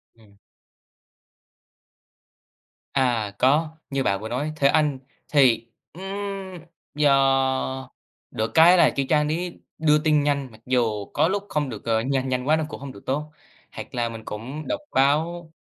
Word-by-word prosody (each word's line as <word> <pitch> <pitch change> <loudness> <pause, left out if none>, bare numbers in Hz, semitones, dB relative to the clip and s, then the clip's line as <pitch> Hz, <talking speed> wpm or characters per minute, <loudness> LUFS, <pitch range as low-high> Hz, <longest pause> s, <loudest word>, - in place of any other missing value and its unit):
Ừm. 105 -3 -22 2.6
À, 120 -6 +1
có, 150 +5 +3 0.2
như 135 -1 -1
bạn 100 -2 0
vừa 110 - -6
nói, 145 +5 -2
Thế 140 -2 +3
Anh 150 -3 +2 0.3
thì, 125 -5 +3 0.3
ừm, 185 +3 -10 0.9
do 135 -2 +2 0.4
được 110 -2 -2
cái 175 +3 +7
là - - +6
cái 140 -1 0
trang 150 -1 +3
đấy 175 +3 -3 0.2
đưa 150 -1 +4
tin 150 -1 +2
nhanh. 140 -3 -1
Mặc 110 0 -17
dù 115 -5 0
có 155 +3 +3
lúc 200 +2 -1
không 145 -3 -1
được 110 -1 -8
ờ, 110 -1 +1
nhanh 130 +1 -1
nhanh 125 +1 -2
quá 155 - +5
nó 160 - -1
cũng - - -8
hông 140 -1 -7
được 100 - -15
tốt. 150 +3 -2 0.4
Hoặc 130 - -9
là 120 -1 0
mình 115 -1 -9
cũng 130 +9 -7
đọc 305 - -2
báo 160 +5 +1
135 Hz, 160 wpm, -24 LUFS, 120-150 Hz, 2.6 s, cái